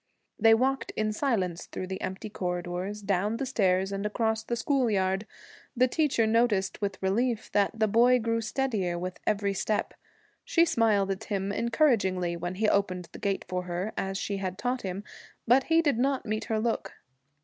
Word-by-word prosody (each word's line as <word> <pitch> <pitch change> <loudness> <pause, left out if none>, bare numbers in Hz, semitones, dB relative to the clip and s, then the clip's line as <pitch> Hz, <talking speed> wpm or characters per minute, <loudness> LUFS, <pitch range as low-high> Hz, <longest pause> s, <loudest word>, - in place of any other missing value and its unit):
They 225 0 +7
walked 265 +3 0
in 215 0 0
silence 200 - -1
through - - -5
the 190 +1 -5
empty 190 +3 -4
corridors, 180 +2 -4
down 200 +3 0
the 270 - -2
stairs, 195 -6 +1
and 195 0 -3
across 220 +1 0
the 235 - -2
school 255 +1 +1
yard. 190 0 0 0.5
The 255 +1 +5
teacher 270 -5 +1
noticed 220 -4 +1
with 200 -1 -2
relief 225 +4 0
that 205 +2 +1
the 220 - +3
boy 240 +4 +5
grew 230 -1 0
steadier 220 -8 -1
with 180 +1 -5
every 200 -1 +1
step. 210 +2 -1 0.5
She 335 - +3
smiled 220 - +2
at 190 - -4
him 200 -1 -2
encouragingly 200 - +1
when 175 +2 -4
he 215 +3 +1
opened 185 -4 0
the - - -10
gate 200 -1 -1
for 180 0 -3
her, 180 +4 -3
as 195 0 -2
she 200 0 -2
had 185 -1 -4
taught 250 +2 -1
him, 190 +1 -4 0.4
but 255 +3 +5
he 330 +1 +3
did 280 -7 +1
not 270 +1 +1
meet 215 0 -2
her 220 -1 0
look. 230 +1 -2
210 Hz, 180 wpm, -28 LUFS, 190-235 Hz, 0.5 s, They